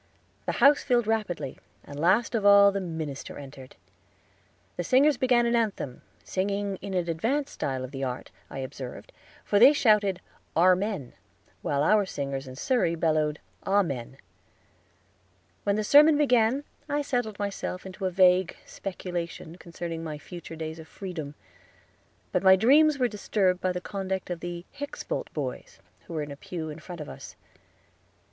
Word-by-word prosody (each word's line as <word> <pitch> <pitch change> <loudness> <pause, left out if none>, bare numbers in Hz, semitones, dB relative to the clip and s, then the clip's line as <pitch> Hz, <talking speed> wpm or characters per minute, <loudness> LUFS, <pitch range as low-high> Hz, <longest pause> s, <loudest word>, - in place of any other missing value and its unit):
The - - 0
house 285 +1 +5
filled 245 -4 +2
rapidly, 205 -11 -2 0.2
and 145 0 -9
last 190 +10 +3
of 225 -3 0
all 200 0 +8
the 195 0 -2
minister 160 -6 -5
entered. 135 -2 -11 1.0
The 175 - -2
singers 275 - +4
began 245 -1 +3
an 235 0 +2
anthem, 205 - -1 0.2
singing 200 +1 -2
in 195 0 -6
an 175 -2 0
advanced 240 - -1
style 130 -2 -3
of 130 - -7
the 135 -1 -5
art, 125 -1 -4 0.2
I - - -8
observed, 130 -1 -7 0.3
for 205 - +3
they 260 +6 +9
shouted 210 -8 +3 0.4
"Armen," 185 - +2 0.5
while 140 0 0
our 205 +4 +4
singers 140 -4 -4
in 130 - -9
Surrey 170 - +1
bellowed 155 -2 +1 0.3
"Amen." 140 -11 0 1.5
When 200 -1 +2
the 215 - 0
sermon 295 +6 +7
began 250 -2 +3 0.3
I 290 0 0
settled 245 -7 -2
myself 200 -2 -4
into 190 0 -4
a - - 0
vague 185 0 +4
speculation 175 -3 -6
concerning 170 -2 -6
my 155 -2 -5
future 170 +2 -9
days 160 0 -6
of 160 - -11
freedom; 160 -5 -7 1.0
but 180 - +1
my 190 0 +7
dreams 285 +9 +5
were 250 -2 +2
disturbed 195 -4 0
by 185 - +1
the 180 - -3
conduct 190 -1 -4
of 175 - -3
the 175 0 -6
Hickspold 285 - -5
boys, - - -5 0.3
who - - -8
were 155 - -1
in 145 - -7
a - - -6
pew 160 0 -6
in 150 - -9
front 175 -3 -8
of 150 - -7
us. - - -10
185 Hz, 160 wpm, -27 LUFS, 160-220 Hz, 1.5 s, they